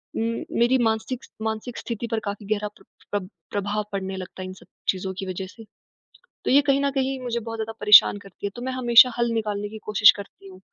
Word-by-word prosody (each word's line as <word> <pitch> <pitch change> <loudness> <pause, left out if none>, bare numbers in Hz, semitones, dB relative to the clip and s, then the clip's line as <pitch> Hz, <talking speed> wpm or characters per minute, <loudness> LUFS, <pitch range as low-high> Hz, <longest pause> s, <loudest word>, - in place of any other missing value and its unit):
उम, 230 +1 -2 0.2
मेरी 240 +2 +4
मानसिक 225 +3 -1 0.2
मानसिक 220 +2 -4
स्थिति 235 0 -5
पर 225 - +1
काफ़ी 200 0 -5
गहरा 210 0 -3
प्र - - -20 0.3
प्रभ 200 -3 -2 0.2
प्रभाव 205 +1 -2
पड़ने 195 -1 -3
लगता 185 0 -8
है 185 - -5
इन 185 - -7
सब 190 - -17 0.2
चीज़ों 190 0 -1
की 195 - -4
वजह 185 0 -4
से। 225 +4 -14 0.8
तो - - +1
ये 280 +2 +7
कहीं 275 0 +4
ना 280 - +2
कहीं 270 0 -1
मुझे 240 -2 -2
बहुत 225 0 -6
ज़्यादा 220 0 -3
परेशान 210 0 +7
करती 200 -1 -10
है, - - 0
तो 240 - -8
मैं 260 +1 -3
हमेशा 250 -1 +7
हल 235 0 +1
निकालने 205 -2 -2
की 220 - -8
कोशिश 210 0 +7
करती 200 0 -11
हूँ। 185 -1 -13
220 Hz, 225 wpm, -24 LUFS, 200-235 Hz, 0.8 s, ये